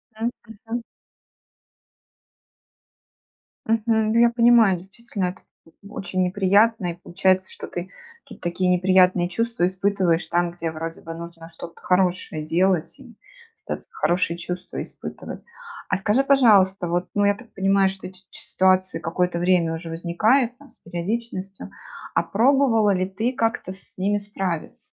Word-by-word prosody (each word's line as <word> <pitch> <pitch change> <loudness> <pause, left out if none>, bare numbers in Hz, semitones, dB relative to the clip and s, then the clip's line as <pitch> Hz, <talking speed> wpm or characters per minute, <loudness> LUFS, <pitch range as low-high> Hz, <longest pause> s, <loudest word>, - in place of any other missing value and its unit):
М, 225 +2 -1 0.2
мгм. 225 +2 -6 2.8
Мгм, 220 -1 +1
я 235 0 +6
понимаю, 235 -5 +5
действительно, 195 +2 -5
это 180 - -11 0.5
очень 190 -2 -3
неприятно, 200 +1 +2
и - - -6
получается, 185 +1 +1
что - - -5
ты 175 +1 -6 0.4
ты - - -12
такие 180 +1 -1
неприятные 180 0 +4
чувства 230 +1 -1
испытываешь 185 -2 +1
там, 175 0 0
где 170 -1 -4
вроде 165 +1 -6
бы 165 - -7
нужно 165 0 -9
что-то 170 0 -10
хорошее 180 -4 0
делать 175 +2 +1
и 245 -5 -15 0.5
пытаться - - -6
хорошие 175 - 0
чувства 180 +1 -5
испытывать. - - -8 0.5
А 190 - +1
скажи, 210 +7 +2
пожалуйста, 205 -10 +4
вот, 175 +2 -1
ну, 205 0 +3
я 205 - +4
так 230 +2 -16
понимаю, 195 0 +3
что 190 0 -7
эти 185 0 -13
ч - - -11
ситуации 185 0 +1
какое-то 175 +1 -1
время 175 -2 +2
уже 165 +1 -6
возникают 215 +10 +1
там 285 +1 -18
с - - -10
периодичностью, 195 +2 -5 0.5
а - - +3
пробовала 230 -2 +3
ли 185 0 0
ты 220 +6 -2
как-то 225 -6 -1
с 190 - -7
ними 200 +2 +1
справиться? 195 -5 -4
190 Hz, 140 wpm, -23 LUFS, 175-220 Hz, 2.8 s, я